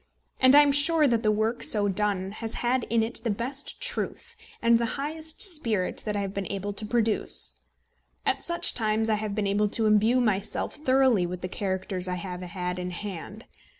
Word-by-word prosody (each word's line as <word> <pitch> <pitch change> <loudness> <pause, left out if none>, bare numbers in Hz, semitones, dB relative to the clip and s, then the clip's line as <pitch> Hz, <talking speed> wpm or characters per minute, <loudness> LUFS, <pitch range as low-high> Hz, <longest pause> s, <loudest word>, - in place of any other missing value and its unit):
And 260 +1 +6
I 290 - +10
am 290 -1 +4
sure 295 +2 +4
that 235 -3 +1
the 215 -2 +2
work 220 +3 -1
so 205 -2 +3
done 195 -1 0
has 225 +1 -5
had 245 +1 0
in 230 -1 +1
it 230 +1 -3
the 235 - -1
best 250 +7 -4
truth - - -4 0.2
and 230 0 +4
the 235 - 0
highest 315 +6 -3
spirit 235 - +1
that 210 - -1
I 205 - -1
have 195 -1 -4
been 200 -2 -4
able 200 +1 -4
to 215 +1 -5
produce. 225 -1 +1 0.6
At - - 0
such 345 0 0
times 220 -1 0
I 215 -1 0
have 210 -2 -3
been 210 -1 -1
able 205 +1 +1
to 225 +1 0
imbue 215 +4 +4
myself 210 -4 -1
thoroughly 260 - +2
with 180 0 -6
the 185 - -3
characters 190 -1 -3
I 180 - -2
have 180 0 -6
had 180 0 -4
in 180 0 -4
hand. 200 +3 -7
215 Hz, 200 wpm, -26 LUFS, 195-245 Hz, 0.6 s, I